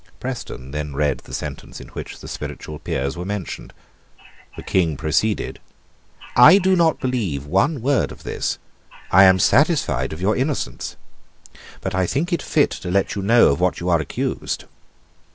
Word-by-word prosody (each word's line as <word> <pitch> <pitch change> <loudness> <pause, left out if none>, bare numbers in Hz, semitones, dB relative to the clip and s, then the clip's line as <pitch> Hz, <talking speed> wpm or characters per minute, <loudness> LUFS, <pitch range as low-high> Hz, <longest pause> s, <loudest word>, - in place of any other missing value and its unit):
Preston 115 - -6
then 75 -1 -4
read 70 -2 0
the - - -15
sentence - - -6
in - - -11
which - - -8
the - - -9
Spiritual 75 -1 -7
Peers 70 +1 -2
were 90 - -5
mentioned. 100 -1 -5 0.9
The - - -7
King 85 -6 +1
proceeded: 80 - 0 0.8
"I 150 +10 +9
do 190 -1 +3
not 165 -3 +3
believe 105 - -2
one 110 - +1
word 140 0 +1
of - - -12
this: - - -2 0.5
I 95 +2 +8
am 95 0 +6
satisfied 145 - +2
of 80 - -6
your 100 +4 +1
innocence; 130 - -2 0.9
but 95 - -3
I 95 -1 +1
think 170 - -1
it 170 - 0
fit 145 - +2
to 90 - -6
let 95 +2 +1
you 100 - -3
know 115 +5 +5
of 70 - 0
what 90 -1 +1
you 90 - -2
are 85 -2 +4
accused." 75 - -3
95 Hz, 170 wpm, -21 LUFS, 80-130 Hz, 0.9 s, I